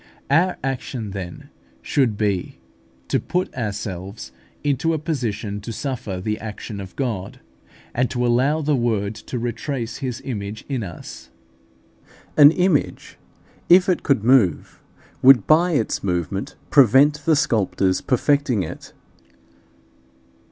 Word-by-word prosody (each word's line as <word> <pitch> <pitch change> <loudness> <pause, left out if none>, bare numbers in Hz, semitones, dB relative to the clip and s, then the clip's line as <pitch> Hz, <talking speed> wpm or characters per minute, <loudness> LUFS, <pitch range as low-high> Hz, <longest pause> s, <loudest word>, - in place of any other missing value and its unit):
Our 175 +5 +3
action 130 -5 -4
then 90 -3 -8 0.3
should 120 - +1
be, 100 -4 -1 0.5
to - - +1
put 180 +1 -2
ourselves 100 - -5 0.3
into 145 +3 +1
a - - 0
position 115 -10 -3
to 115 - -6
suffer 115 -6 -4
the 105 +3 -3
action 105 -1 -7
of 95 -1 -10
God, 115 -9 -3 0.5
and 125 +1 +1
to 125 -1 -1
allow 130 +6 +2
the 150 0 +2
Word 110 -4 0
to 115 +3 -7
retrace 120 +1 -4
His 130 -4 -4
image 105 -4 -5
in 135 -4 -2
us. 90 -6 -9 1.1
An 145 -1 +9
image, 180 -2 0 0.5
if 180 +1 +7
it 185 - +1
could 135 -7 +1
move, 115 - +2 0.4
would 130 -5 +7
by 170 +3 +4
its 115 -8 -1
movement 95 +1 -2 0.2
prevent 140 +3 +5
the 160 - +4
sculptor's 100 - +1
perfecting 130 -4 +1
it. 80 - -9
120 Hz, 125 wpm, -22 LUFS, 100-140 Hz, 1.1 s, An